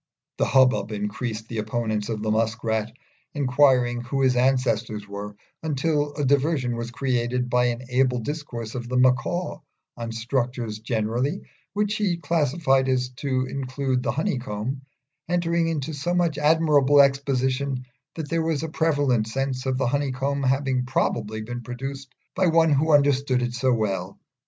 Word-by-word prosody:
The - - +3
hubbub 130 -4 +3
increased, 110 +2 -4
the 115 -1 -4
opponents 110 -1 -2
of 110 -2 -3
the 110 - 0
Musk 115 +1 0
rat 110 -1 -1 0.4
inquiring 125 -3 +3
who 135 +3 -1
his 130 -1 +3
ancestors 120 -5 +1
were; 100 +1 -7 0.3
until 150 -1 0
a 145 - -1
diversion 135 -2 +1
was 115 0 -4
created 125 -1 -1
by 125 0 +3
an 120 +1 -1
able 125 0 +2
discourse 120 -3 -5
of 120 -1 -5
the 125 - 0
Macaw 135 +8 +1 0.4
on 115 -1 -5
structures 120 -1 -2
generally, 120 - -1 0.3
which 210 +1 0
he 195 -5 0
classified 145 -4 +1
so - - +2
as 125 -1 0
to 130 -3 -1
include 130 -1 -2
the - - 0
honeycomb, 130 -3 -2 0.5
entering 170 -1 +1
into 155 -1 -2
so 150 +5 -2
much 170 -4 +1
admirable 150 -2 +4
exposition 135 -1 +2 0.3
that 160 -3 -4
there 165 +1 0
was 160 -2 -1
a 160 - -3
prevalent 145 -8 +1
sense 130 +2 -2
of 130 -1 0
the 135 - 0
honeycomb 140 +1 -1
having 135 -1 +1
probably 110 -4 -1
been 120 +2 -5
produced 135 +2 -6 0.2
by 185 -1 +2
one 165 -1 +4
who 155 +3 +2
understood 140 -3 +3
it 120 0 -2
so 130 +1 +1
well. 100 -5 -1
130 Hz, 155 wpm, -24 LUFS, 120-145 Hz, 0.5 s, admirable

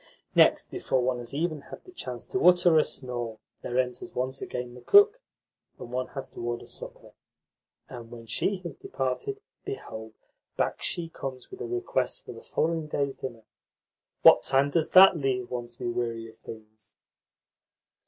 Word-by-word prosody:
Next, - - +4
before 130 - 0
one 125 0 0
has 120 -1 -8
even 155 +1 -1
had - - -11
a 370 - -13
chance 125 - -6
to 190 - -2
utter 175 -2 +6
a - - +5
snore, 120 -6 -3 0.2
there 120 - -3
enters 130 +8 -1
once 130 +2 -1
again 125 -1 -5
the 125 - -12
cook, 420 - +6 0.6
and 120 - -9
one 125 0 -2
has 135 - -4
to - - -9
order 120 0 -3
supper; - - -8 0.8
and 120 -2 -9
when 115 -1 -10
she 200 - 0
has 170 -4 -5
departed, 135 - -3 0.2
behold, 110 - -7 0.4
back - - 0
she 170 -1 -1
comes 135 -5 -7
with 380 +2 -9
a 400 - -3
request 380 +7 -2
for - - -7
the - - -10
following 160 -1 -1
day's 140 -2 -1
dinner! 120 -4 -7 0.8
What - - +9
time 135 +1 +2
does 160 0 +1
THAT 185 -1 +8
leave 130 -4 -1
one 120 -1 -3
to 120 0 -10
be 125 - -6
weary 120 -1 -2
of 110 - -15
things?" 110 -1 -13
130 Hz, 175 wpm, -28 LUFS, 120-170 Hz, 0.8 s, What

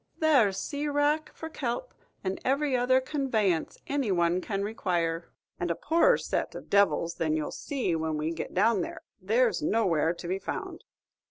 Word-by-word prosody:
There's 260 -12 +4
sea 290 +7 -3
wrack 295 +2 +1
for 320 - -6
kelp, 300 - -4 0.3
and 190 0 -3
every 275 +1 +1
other 250 +1 +4
con 270 +1 -3
vanience 195 -8 +1
any 275 -7 0
one 175 0 +2
can 195 0 -2
require; 175 -6 -1 0.3
and 175 - -1
a 170 - +1
poorer 340 - +3
set - - -2
of - - -9
devils 200 -4 +3
than 155 -1 +1
ye 155 - 0
'll - - -5
see 255 - -2
when 160 -1 -1
we 155 +2 -1
get 165 - -5
down 210 +1 +3
there, - - -6 0.2
there's 220 +1 +2
nowhere 165 -3 +2
to 170 - -8
be 190 +2 -1
found. - - -6
205 Hz, 180 wpm, -28 LUFS, 170-275 Hz, 0.3 s, There's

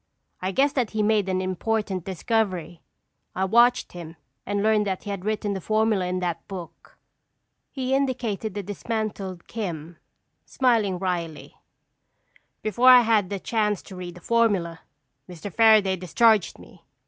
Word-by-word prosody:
I 185 +1 -1
guessed 275 +7 +2
that 245 -6 0
he 220 - -5
had - - +2
made 210 -3 +2
an 185 0 0
important 190 0 -2
discovery. 185 -4 -2 0.5
I 190 - 0
watched 240 +5 +3
him 170 -2 -9 0.3
and 205 0 -1
learned 215 -1 +2
that 190 -2 -3
he 205 - -5
had 195 -1 -6
written 210 -1 -1
the 190 - -4
formula 215 -2 +1
in 185 0 -2
that 170 -2 -3
book." 185 -4 -10 0.7
He 260 -1 -3
indicated 240 -7 -1
the 205 - -3
dismantled 205 -3 -4
"Kim," 170 -7 -6 0.5
smiling 225 -8 +1
wryly. 175 -4 -4 1.1
"Before 235 +4 +4
I 250 -1 +9
had 220 -5 +1
a 200 - -1
chance 210 -1 -1
to 190 - -11
read 180 -1 -7
the 180 - -13
formula, 195 -7 +1 0.5
Mr. 180 +2 -8
Fairaday 215 -4 +5
discharged 215 +2 +2
me. 170 - -17
205 Hz, 150 wpm, -24 LUFS, 180-225 Hz, 1.1 s, I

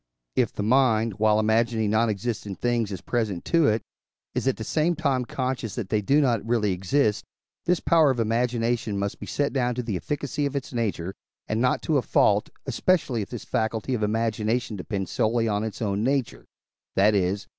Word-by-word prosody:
If - - +2
the 105 - -4
mind, 115 -3 +2
while 110 0 +4
imagining 110 0 +2
non 110 +1 +3
existent 105 -2 -3
things 120 -3 0
as 95 - -5
present 110 -7 -2
to 165 -3 +3
it, 110 0 +1 0.5
is - - -1
at 135 - +1
the 110 - -5
same 160 +8 +1
time 140 -6 0
conscious 125 -4 -3
that 110 -6 -4
they 110 0 +1
do 140 +9 +3
not 120 -6 +1
really 115 -3 +1
exist, 105 +5 +1 0.4
this 180 -1 +3
power 160 -3 +4
of 130 -3 0
imagination 115 -1 0
must 100 0 -3
be - - -7
set 145 -1 -1
down 125 -3 0
to 125 - -2
the 110 -4 -3
efficacy 145 - -2
of 140 - -6
its 140 -1 -4
nature, 95 -6 -2 0.3
and 110 +1 -1
not 125 - +1
to 155 - +2
a - - +2
fault, - - +2 0.2
especially 150 -11 +1
if 100 - -6
this 120 - -7
faculty 110 +3 -1
of 120 - -1
imagination 110 +1 0
depend 95 0 -3
solely 115 +1 +1
on 105 -1 0
its 110 +1 -4
own 100 0 0
nature 120 - -1 0.5
that 105 +2 +4
is 100 0 +1
(I. - - -39
115 Hz, 200 wpm, -25 LUFS, 105-125 Hz, 0.5 s, while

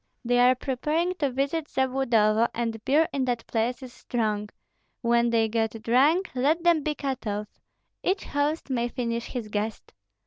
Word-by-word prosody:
They 245 +1 +3
are 250 +1 +6
preparing 300 +7 -1
to 285 -3 +1
visit 280 +4 -1
Zabludovo, 235 -5 +2
and 230 -2 -3
beer 310 +4 +4
in 275 - 0
that 245 -2 -2
place 240 +4 -1
is 250 -1 -9
strong; 210 -3 -2 0.5
when 235 0 +3
they 225 -1 +2
get 225 0 -2
drunk, 290 +11 +3
let 295 +6 +1
them 340 -3 +4
be 300 +1 -2
cut 270 -5 -4
off, 210 0 -5 0.4
each 385 +2 0
host 290 0 -1
may 240 -2 0
finish 235 -1 -3
his 240 -4 -5
guest. 210 +1 -4
245 Hz, 165 wpm, -26 LUFS, 230-285 Hz, 0.5 s, are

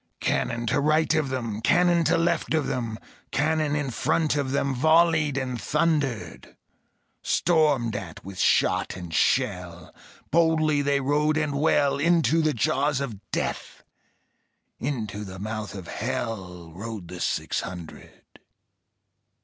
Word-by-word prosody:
Cannon 115 0 -1
to 110 - +1
right 155 +2 +2
of 155 -4 +1
them, 115 -5 -3
Cannon 175 +6 +3
to 165 +4 +3
left 170 -1 +1
of 155 -3 +1
them, 115 -3 -3 0.3
Cannon 155 0 +1
in 145 -3 -2
front 155 +5 +1
of 140 -2 -1
them 140 0 0
Volleyed 155 +1 +3
and 130 -3 -3
thundered. 150 -6 -1 0.6
Stormed 150 -10 +2
at 90 -5 -7
with 95 -1 -8
shot - - +2
and 90 -3 -8
shell, - - 0 0.4
Boldly 155 -3 +3
they 140 0 +1
rode 150 +3 +1
and 150 -2 0
well; 140 -1 +2
Into 165 -1 +3
the 155 -1 +2
jaws 135 +3 +1
of 110 -8 -6
Death, - - -4 1.0
Into 110 -7 -3
the 95 -2 -8
mouth 105 0 -5
of 95 -3 -8
Hell, 100 -8 -4
Rode 105 -1 -7
the 90 +1 -8
six - - -1
hundred. 90 -3 -11
140 Hz, 135 wpm, -25 LUFS, 110-155 Hz, 1.0 s, Cannon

